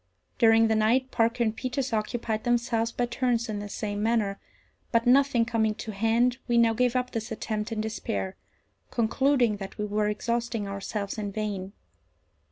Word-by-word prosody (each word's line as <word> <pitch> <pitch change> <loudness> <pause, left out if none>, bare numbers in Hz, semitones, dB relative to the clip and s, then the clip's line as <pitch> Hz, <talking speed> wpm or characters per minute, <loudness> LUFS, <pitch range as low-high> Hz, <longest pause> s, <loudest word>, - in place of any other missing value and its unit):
During 225 -1 +6
the 220 - +2
night 235 +5 +2
Parker 230 +1 +2
and 220 -1 0
Peters 255 +1 -3
occupied 220 0 -1
themselves 235 -1 +1
by 245 - 0
turns 240 -1 0
in 210 -1 -3
the 205 0 -6
same 205 0 -3
manner; 215 -3 +1 0.5
but 230 -1 +2
nothing 255 -2 +4
coming 220 -2 +1
to 220 - -6
hand, 230 +4 +2
we 240 -1 +2
now 230 -1 +5
gave 250 +2 +1
up 250 0 0
this 225 0 -4
attempt 215 0 -3
in 220 -1 -1
despair, 100 - -3 0.5
concluding 240 -1 +2
that 195 -1 -8
we 210 - -2
were 210 0 0
exhausting 230 0 -2
ourselves 200 +1 -4
in 205 -1 -3
vain. 200 -2 -4
225 Hz, 170 wpm, -27 LUFS, 210-240 Hz, 0.5 s, During